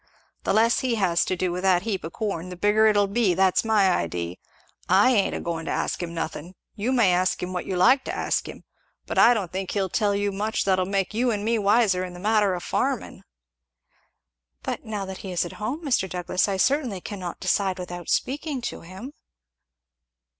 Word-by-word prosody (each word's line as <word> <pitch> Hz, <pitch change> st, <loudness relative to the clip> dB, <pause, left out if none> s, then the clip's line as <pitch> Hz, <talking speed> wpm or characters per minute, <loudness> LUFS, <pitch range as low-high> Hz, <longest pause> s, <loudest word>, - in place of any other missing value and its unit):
"The -, -, +1 dB
less 225 Hz, +3 st, +4 dB
he 255 Hz, -3 st, 0 dB
has 180 Hz, -5 st, +2 dB
to 185 Hz, -, -1 dB
do 180 Hz, 0 st, -1 dB
with 180 Hz, +1 st, -3 dB
that 185 Hz, -1 st, +3 dB
heap 210 Hz, -4 st, -2 dB
of 160 Hz, -, -5 dB
corn 195 Hz, -6 st, -3 dB
the 180 Hz, -, -7 dB
bigger 210 Hz, +4 st, +3 dB
it'll 205 Hz, -1 st, +4 dB
be 200 Hz, -2 st, +1 dB
that's 190 Hz, 0 st, +3 dB
my 215 Hz, -3 st, +3 dB
idee, 85 Hz, -, -2 dB, 0.5 s
I 195 Hz, +8 st, +5 dB
ain't 205 Hz, -6 st, +2 dB
agoin' 165 Hz, -1 st, -4 dB
to -, -, -3 dB
ask -, -, -2 dB
him 170 Hz, -1 st, -4 dB
nothin' 165 Hz, +2 st, -5 dB, 0.2 s
you 225 Hz, +4 st, -2 dB
may 230 Hz, -8 st, +4 dB
ask 180 Hz, +1 st, +1 dB
him 180 Hz, +1 st, -4 dB
what 180 Hz, -, -4 dB
you 185 Hz, -, -2 dB
like 260 Hz, +10 st, +5 dB
to -, -, -4 dB
ask -, -, -1 dB
him -, -, -10 dB, 0.4 s
but -, -, -1 dB
I 240 Hz, +1 st, +7 dB
don't 190 Hz, -6 st, -3 dB
think 190 Hz, 0 st, -4 dB
he'll 195 Hz, -2 st, -1 dB
tell 205 Hz, +2 st, +1 dB
you 205 Hz, 0 st, 0 dB
much 210 Hz, +3 st, -1 dB
that'll 185 Hz, -1 st, +2 dB
make 195 Hz, 0 st, -1 dB
you 245 Hz, +3 st, +1 dB
and 210 Hz, -2 st, -2 dB
me 230 Hz, 0 st, +1 dB
wiser 205 Hz, -2 st, +3 dB
in 180 Hz, -1 st, -6 dB
the -, -, -9 dB
matter 210 Hz, -1 st, +2 dB
o' -, -, -4 dB
farmin'." -, -, -2 dB, 1.4 s
"But -, -, -4 dB
now 210 Hz, -3 st, -4 dB
that 190 Hz, 0 st, -7 dB
he 190 Hz, -, -7 dB
is 175 Hz, -, 0 dB
at 175 Hz, -, -8 dB
home, 270 Hz, +10 st, -3 dB
Mr. 240 Hz, -9 st, +1 dB
Douglass, 180 Hz, +1 st, 0 dB
I 195 Hz, -1 st, -1 dB
certainly 250 Hz, -3 st, +1 dB
cannot 180 Hz, -2 st, -6 dB
decide 190 Hz, -2 st, 0 dB
without 175 Hz, -1 st, -7 dB
speaking 290 Hz, +1 st, -1 dB
to 240 Hz, -, -5 dB
him." 190 Hz, -, -10 dB
195 Hz, 210 wpm, -25 LUFS, 180-220 Hz, 1.4 s, I